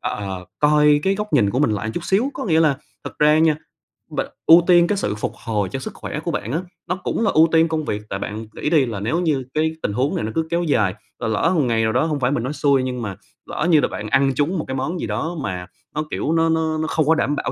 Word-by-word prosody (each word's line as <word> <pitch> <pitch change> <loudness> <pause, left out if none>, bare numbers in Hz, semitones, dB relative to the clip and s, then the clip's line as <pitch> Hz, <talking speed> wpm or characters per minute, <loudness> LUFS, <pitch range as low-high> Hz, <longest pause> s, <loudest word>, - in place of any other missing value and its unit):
ơ, - - -3
ờ, 95 -3 -5
coi 150 0 +4
cái 195 +4 +2
góc 210 +1 -5
nhìn 110 -9 +3
của 125 - -1
mình 145 -5 +3
lại 105 +1 -2
chút 175 - -4
xíu, 225 +9 +1
có - - -4
nghĩa 165 -4 +3
là 150 -4 +3 0.3
thật - - -8
ra 150 +1 +5
nha, 160 -1 +4 0.5
b - - -5 0.3
ưu 165 +2 +9
tiên 175 -1 +6
cái 205 - 0
sự 105 - -1
phục 105 - -3
hồi 105 -4 -1
cho 135 - -4
sức - - -7
khỏe - - -6
của - - -3
bạn 105 +4 -3
á, 155 - 0 0.3
nó 180 - 0
cũng 190 +4 -2
là - - +2
ưu 160 +1 +5
tiên 165 0 +4
công 160 -1 -2
việc. 105 - -2
Tại 95 - -3
bạn 110 +3 -5
nghĩ - - -2
đi 150 -5 +4
là 110 -5 -4
nếu 115 - -1
như 150 -6 0
cái 155 +1 +1
tình 100 - -1
huống 130 +6 0
này - - -2
nó 110 - -3
cứ 160 0 0
kéo 170 +1 0
dài, 110 - +1 0.2
rồi 115 - -2
lỡ 110 +10 +1
một 155 - +3
ngày 115 -3 +1
nào 110 - +1
đó, 130 - +2
hông 150 -3 -1
phải 125 0 +1
mình 120 -5 -1
nói 135 +4 -3
xui, 140 -3 +2
nhưng 125 -1 -3
mà 100 -4 -4 0.3
lỡ 165 - -2
như 160 -3 +6
là - - +2
bạn 105 - -6
ăn 135 +3 +3
trúng 155 +7 0
một - - -3
cái 130 - -3
món 160 +7 -2
gì - - -3
đó 170 +2 -3
mà 90 -6 -4 0.3
nó, 155 - 0
kiểu, 155 - -1
nó 165 0 +2
nó 160 -1 0
nó 160 0 -1
không 155 -2 +1
có 160 - +5
đảm 145 -2 0
bảo - - -2
150 Hz, 295 wpm, -21 LUFS, 115-160 Hz, 0.5 s, ưu